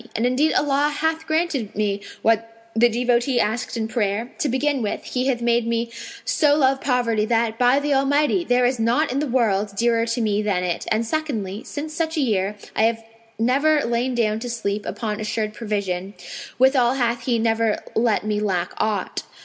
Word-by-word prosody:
And 225 - 0
indeed 270 +5 +2
Allah 290 0 +2
hath 320 0 -1
granted 315 -9 -1
me 200 -1 -1 0.2
what 225 +1 -1
the 240 +2 +5
devotee 245 +2 +1
asked 230 +3 -1
in 220 -1 -1
prayer: 220 +1 -1
to 290 - 0
begin 275 +2 0
with 210 - -3
He 255 +1 -2
hath 245 -3 0
made 235 -1 +2
me 230 0 -1 0.3
so 295 -3 +3
love 270 -2 +2
poverty 240 -5 +1
that, 225 0 0
by 250 +2 +4
the 290 0 0
Almighty! 285 +6 +2
there 245 -5 +2
is 250 -1 +1
naught 240 +6 +2
in 265 - -1
the 300 - -1
world 210 -5 +1
dearer 230 +1 +1
to 230 +1 -1
me 210 -2 +1
than 200 -4 0
it, 175 -1 -3
and 220 +1 +1
secondly 225 -8 -3
since 305 +1 -6
such 320 0 -2
a - - +2
year, 210 -6 0 0.2
I 220 - +3
have 225 0 0 0.3
never 280 +6 +2
lain 240 +2 0
down 220 -2 +1
to 245 +2 -5
sleep 210 -3 -3
upon 215 -2 -3
assured 215 0 -2
provision; 200 -4 -3 0.4
withal 260 -1 +4
hath 235 -2 -1
He 245 -2 +2
never 225 -1 +1 0.2
let 225 -2 +1
me 210 -1 0
lack 185 -4 -1
aught. 210 -3 -1
235 Hz, 190 wpm, -22 LUFS, 215-265 Hz, 0.4 s, the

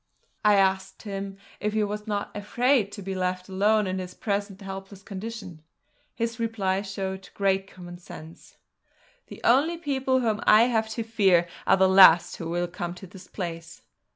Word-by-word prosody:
I 210 -1 +5
asked 190 -1 +1
him 195 -2 -6 0.2
if 210 0 -2
he 215 -1 +1
was 210 +1 -4
not 205 -1 -3
afraid 225 +1 +1
to 205 - -8
be 195 +1 -4
left 185 0 -2
alone 205 +3 +2
in 185 0 -2
his 180 -1 -7
present 200 -2 -3
helpless 195 0 -9
condition: 195 -4 -7 0.5
His 230 0 -3
reply 200 -4 -1
showed 195 -1 -5
great 195 -1 +1
common 175 -2 -11
sense: 160 -2 -13 0.7
"The - - -11
only 290 +8 +3
people 265 -4 0
whom 220 -2 0
I 215 +2 +7
have 225 -2 +1
to 230 - -1
fear 195 -6 +3 0.2
are 190 - +5
the 190 0 +5
last 185 -3 +7
who 165 - -5
will 175 +1 -1
come 175 0 -5
to 185 - -10
this 185 0 -13
place!" 165 -4 -7
195 Hz, 170 wpm, -26 LUFS, 185-215 Hz, 0.7 s, I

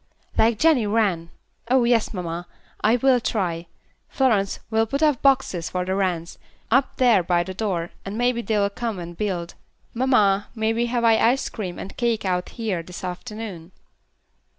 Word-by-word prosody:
"Like 225 0 +3
Jenny 285 -6 +3
Wren. 200 -6 +1 0.4
Oh, 255 0 +4
yes, 235 -2 +2
mamma, 175 -2 -5 0.4
I 220 +3 +4
will 255 +1 +3
try. 175 -7 -2 0.4
Florence, 215 -7 +1
we'll 225 0 +2
put 275 +6 -1
up 295 -5 +3
boxes 250 -11 +2
for 180 -1 -2
the 190 - -1
wrens, 180 -4 -2 0.3
up 265 +3 +2
there 240 -7 +5
by 175 0 +1
the 190 - -6
door, 185 -4 -2
and 195 +2 -5
maybe 245 0 +1
they 220 -2 -1
will 200 0 +1
come 225 -1 -3
and 175 -1 -7
build. 180 -4 -3 0.4
Mamma, 215 -6 +3
may 220 0 0
we 235 +1 0
have 240 0 -1
our 230 - +6
ice 235 +4 +3
cream 185 -6 -5
and 195 - -8
cake 235 -4 0
out 180 -1 -1
here 215 -7 -3
this 180 +2 -10
afternoon?" 185 -2 -7
210 Hz, 175 wpm, -23 LUFS, 180-235 Hz, 0.4 s, our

